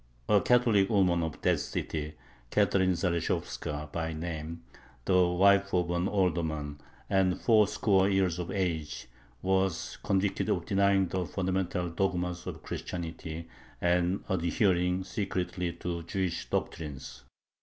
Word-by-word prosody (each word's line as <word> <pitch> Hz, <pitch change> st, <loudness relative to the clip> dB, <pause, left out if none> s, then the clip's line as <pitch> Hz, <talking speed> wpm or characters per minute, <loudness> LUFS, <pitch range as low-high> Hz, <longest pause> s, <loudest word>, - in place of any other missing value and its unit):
A 105 Hz, -2 st, +5 dB
Catholic 115 Hz, -6 st, +4 dB
woman 90 Hz, -5 st, +3 dB
of 80 Hz, -2 st, -3 dB
that -, -, +3 dB
city, 75 Hz, -1 st, -4 dB, 0.4 s
Catherine 95 Hz, +5 st, +3 dB
Zaleshovska 85 Hz, -4 st, -2 dB
by 80 Hz, -1 st, -2 dB
name, 80 Hz, 0 st, -5 dB, 0.4 s
the 90 Hz, -1 st, +4 dB
wife 100 Hz, +2 st, +4 dB
of 90 Hz, -1 st, +1 dB
an 85 Hz, +2 st, 0 dB
alderman, 80 Hz, -7 st, -1 dB, 0.3 s
and 95 Hz, -2 st, +2 dB
four 110 Hz, -3 st, +5 dB
score 100 Hz, -2 st, +2 dB
years 95 Hz, -3 st, +1 dB
of 90 Hz, -, -4 dB
age, 80 Hz, -8 st, -2 dB, 0.4 s
was 95 Hz, -2 st, 0 dB
convicted 95 Hz, 0 st, 0 dB
of -, -, 0 dB
denying 100 Hz, -1 st, +3 dB
the 95 Hz, +1 st, -1 dB
fundamental 95 Hz, -2 st, -1 dB
dogmas 90 Hz, -1 st, -1 dB
of -, -, -6 dB
Christianity 85 Hz, -1 st, -5 dB, 0.3 s
and 90 Hz, +2 st, +1 dB
adhering 90 Hz, 0 st, +1 dB
secretly 90 Hz, -3 st, -2 dB
to 85 Hz, 0 st, -4 dB
Jewish 90 Hz, +1 st, -3 dB
doctrines. 70 Hz, -5 st, -4 dB
90 Hz, 125 wpm, -30 LUFS, 85-95 Hz, 0.4 s, A